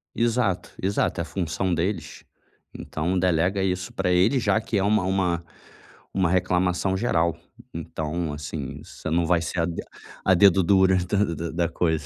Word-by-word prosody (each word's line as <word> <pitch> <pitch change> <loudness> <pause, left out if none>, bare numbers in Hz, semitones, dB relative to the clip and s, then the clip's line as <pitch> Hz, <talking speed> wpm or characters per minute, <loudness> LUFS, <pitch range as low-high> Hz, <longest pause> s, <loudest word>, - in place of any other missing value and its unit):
Exato. 115 -6 0
Exato. 100 +2 0
É - - -1
função 90 0 -2
deles. 85 +2 -3 0.5
Então, 85 +4 -2
delega 90 +2 +1
isso 90 -1 -2
pra 90 - 0
ele, 100 +10 +3
já 110 - +2
que 110 -1 -2
é 95 - +1
uma 105 -1 +2
uma 90 -3 0 0.7
uma 95 -3 +2
reclamação 90 +1 +1
geral. 85 -8 +1 0.4
E 85 - -4
então, 80 0 -3
assim, 75 -2 -6
você - - -7
não 85 +1 +2
vai 85 0 +2
ser 85 +1 -2
a 80 - +2
de 85 -1 -4 0.4
a 95 - +5
dedo 95 0 +5
dura 95 +1 +4
da 100 +2 +1
da 85 -3 -3
da 85 0 0
coisa. 80 -3 0
90 Hz, 170 wpm, -25 LUFS, 85-95 Hz, 0.7 s, a